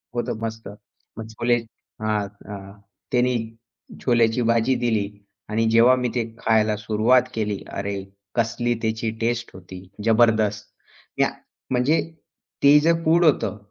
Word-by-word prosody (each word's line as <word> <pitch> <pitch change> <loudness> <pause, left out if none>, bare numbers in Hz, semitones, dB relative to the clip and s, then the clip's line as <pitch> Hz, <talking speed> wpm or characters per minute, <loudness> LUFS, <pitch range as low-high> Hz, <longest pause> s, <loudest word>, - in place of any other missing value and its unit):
होतं 120 -2 -2
मस्त. 110 -1 -5 0.5
मग 110 0 -6
छोले 120 +2 +1 0.5
हां. 105 -2 0 0.2
अ, 100 0 -10 0.3
त्याने 125 -1 +2 0.7
छोल्याची 120 -1 +2
भाजी 115 +3 +2
दिली 110 -4 +1 0.4
आणि 110 +1 +1
जेव्हा 120 +3 +6
मी 125 -1 -1
ते 120 - +1 0.2
खायला 110 -1 +2
सुरुवात 110 +4 +3
केली. 105 -3 -2
अरे, 100 -1 -3 0.3
कसली 120 +1 0
त्याची 110 0 -1
टेस्ट 120 0 -1
होती, 95 0 -11 0.2
जबरदस्त. 110 -2 +3 0.5
त्या - - +2 0.4
म्हणजे 130 +6 +2 0.6
ते 145 +1 +8
जे 165 +3 +3
फूड 170 +2 +4
होतं. 140 -8 +2
115 Hz, 125 wpm, -23 LUFS, 105-120 Hz, 0.7 s, ते